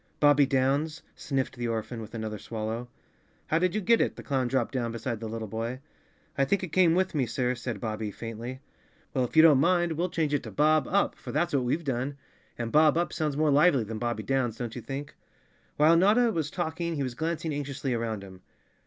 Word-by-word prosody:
"Bobbie 145 Hz, -1 st, +5 dB
Downs," 140 Hz, +4 st, 0 dB
sniffed 135 Hz, -2 st, -2 dB
the 120 Hz, -1 st, -2 dB
orphan, 115 Hz, +1 st, -3 dB
with 110 Hz, +1 st, -9 dB
another 110 Hz, -2 st, -4 dB
swallow. 115 Hz, +2 st, -4 dB, 0.6 s
"How 160 Hz, -, +1 dB
did 185 Hz, +2 st, +1 dB
you 215 Hz, -, 0 dB
get 230 Hz, +5 st, +4 dB
it?" -, -, 0 dB
The -, -, -10 dB
clown 130 Hz, -3 st, 0 dB
dropped 120 Hz, -1 st, 0 dB
down 120 Hz, -3 st, -2 dB
beside 115 Hz, 0 st, -4 dB
the 110 Hz, -, -5 dB
little 110 Hz, 0 st, -4 dB
boy. 115 Hz, +4 st, -4 dB, 0.6 s
"I 140 Hz, -, +2 dB
think 190 Hz, +8 st, +1 dB
it 175 Hz, -, -5 dB
came 175 Hz, -3 st, +5 dB
with 185 Hz, +1 st, +1 dB
me, 135 Hz, -5 st, 0 dB
sir," 125 Hz, +2 st, 0 dB
said 120 Hz, -3 st, -5 dB
Bobbie 110 Hz, -1 st, -3 dB
faintly. 115 Hz, +4 st, -7 dB, 0.5 s
"Well, 130 Hz, -2 st, +1 dB
if 120 Hz, -, -9 dB
you 160 Hz, -, +9 dB
don't 150 Hz, -5 st, +7 dB
mind, 175 Hz, +2 st, +3 dB
we'll 170 Hz, +3 st, -1 dB
change 160 Hz, -4 st, -1 dB
it 145 Hz, -, +1 dB
to 110 Hz, -, -8 dB
Bob 155 Hz, +7 st, +3 dB
Up 200 Hz, +2 st, +2 dB
—for -, -, -9 dB
that's 170 Hz, +3 st, 0 dB
what 135 Hz, -3 st, +1 dB
we've 155 Hz, +7 st, 0 dB
done—and 130 Hz, -3 st, -5 dB
Bob 155 Hz, +1 st, +5 dB
Up 175 Hz, -, 0 dB
sounds 150 Hz, -3 st, -1 dB
more 155 Hz, -1 st, +3 dB
lively 140 Hz, -3 st, +4 dB
than 110 Hz, 0 st, -6 dB
Bobbie 120 Hz, -2 st, -2 dB
Downs, 125 Hz, -3 st, 0 dB
don't 120 Hz, -2 st, -5 dB
you 125 Hz, -, -5 dB
think?" 140 Hz, +4 st, -6 dB, 0.6 s
While 155 Hz, +3 st, +6 dB
Notta 220 Hz, +6 st, +4 dB
was 160 Hz, -6 st, -2 dB
talking 170 Hz, 0 st, -3 dB
he 140 Hz, -, -1 dB
was 130 Hz, -2 st, -3 dB
glancing 160 Hz, +2 st, -2 dB
anxiously 140 Hz, -2 st, -3 dB
around 115 Hz, -3 st, -2 dB
him. 95 Hz, -1 st, -12 dB
135 Hz, 215 wpm, -28 LUFS, 120-160 Hz, 0.6 s, you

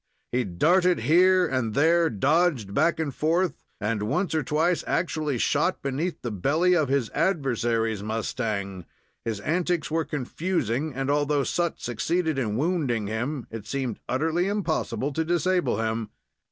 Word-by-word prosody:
He 125 Hz, +1 st, +1 dB
darted 175 Hz, -, +2 dB
here 180 Hz, +7 st, +5 dB
and 130 Hz, -7 st, -1 dB
there, 165 Hz, +2 st, +4 dB
dodged 135 Hz, -, +1 dB
back 170 Hz, +9 st, +2 dB
and 150 Hz, -4 st, -2 dB
forth, 170 Hz, +5 st, 0 dB, 0.2 s
and 105 Hz, 0 st, -1 dB
once 175 Hz, -, -1 dB
or 160 Hz, -, +2 dB
twice 160 Hz, +5 st, +1 dB
actually 155 Hz, -5 st, -1 dB
shot 150 Hz, +9 st, +1 dB
beneath 145 Hz, +6 st, -2 dB
the 120 Hz, -, -3 dB
belly 155 Hz, -, +2 dB
of 155 Hz, -6 st, +1 dB
his 135 Hz, -4 st, 0 dB
adversary's 120 Hz, -, 0 dB
mustang. 105 Hz, -4 st, -3 dB, 0.4 s
His 110 Hz, -3 st, -2 dB
antics 175 Hz, -, 0 dB
were 165 Hz, +1 st, +1 dB
confusing, 150 Hz, -, -2 dB
and, 135 Hz, +1 st, -1 dB
although 145 Hz, -1 st, +1 dB
Sut 170 Hz, +2 st, -1 dB
succeeded 160 Hz, +6 st, -1 dB
in 110 Hz, -4 st, -1 dB
wounding 140 Hz, -, 0 dB
him, 120 Hz, +6 st, -3 dB
it 110 Hz, -2 st, -7 dB
seemed 130 Hz, -3 st, -3 dB
utterly 160 Hz, +7 st, +1 dB
impossible 165 Hz, -7 st, -1 dB
to 160 Hz, -, 0 dB
disable 175 Hz, -, +1 dB
him. 110 Hz, -1 st, -2 dB
145 Hz, 145 wpm, -26 LUFS, 115-170 Hz, 0.4 s, here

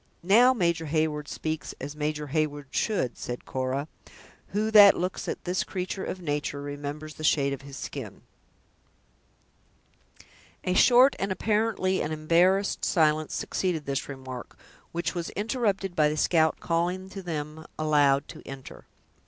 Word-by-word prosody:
"Now 230 Hz, +8 st, +6 dB
Major 170 Hz, -8 st, 0 dB
Heyward 150 Hz, -1 st, 0 dB
speaks 155 Hz, -1 st, -4 dB
as 145 Hz, +2 st, -6 dB
Major 150 Hz, 0 st, -3 dB
Heyward 145 Hz, -2 st, -1 dB
should," 180 Hz, -, -1 dB
said 120 Hz, 0 st, -5 dB
Cora; 130 Hz, +2 st, -2 dB, 0.6 s
"who 215 Hz, +2 st, -1 dB
that 205 Hz, -2 st, +9 dB
looks 180 Hz, +2 st, -3 dB
at -, -, -4 dB
this 180 Hz, +1 st, 0 dB
creature 185 Hz, +1 st, -4 dB
of 185 Hz, -, -4 dB
nature, 145 Hz, -3 st, -2 dB
remembers 145 Hz, +2 st, -6 dB
the 155 Hz, -, -10 dB
shade 140 Hz, -2 st, +2 dB
of 135 Hz, -, -6 dB
his 140 Hz, 0 st, -10 dB
skin?" -, -, -7 dB, 2.4 s
A 180 Hz, -, 0 dB
short 250 Hz, +7 st, +6 dB
and 195 Hz, 0 st, -1 dB
apparently 210 Hz, -1 st, +1 dB
an 155 Hz, -, -2 dB
embarrassed 175 Hz, +6 st, +2 dB
silence 155 Hz, -2 st, +2 dB
succeeded 170 Hz, -6 st, -2 dB
this 140 Hz, 0 st, -3 dB
remark, 130 Hz, -3 st, -8 dB, 0.3 s
which 170 Hz, +1 st, -2 dB
was 170 Hz, -2 st, -3 dB
interrupted 205 Hz, -3 st, -1 dB
by 150 Hz, -1 st, +4 dB
the 155 Hz, -, -3 dB
scout 160 Hz, 0 st, +2 dB
calling 175 Hz, +3 st, -1 dB
to 195 Hz, -, -6 dB
them, 155 Hz, -3 st, -5 dB
aloud, 145 Hz, -2 st, +3 dB
to -, -, -10 dB
enter. 135 Hz, -1 st, -10 dB
160 Hz, 145 wpm, -27 LUFS, 145-185 Hz, 2.4 s, that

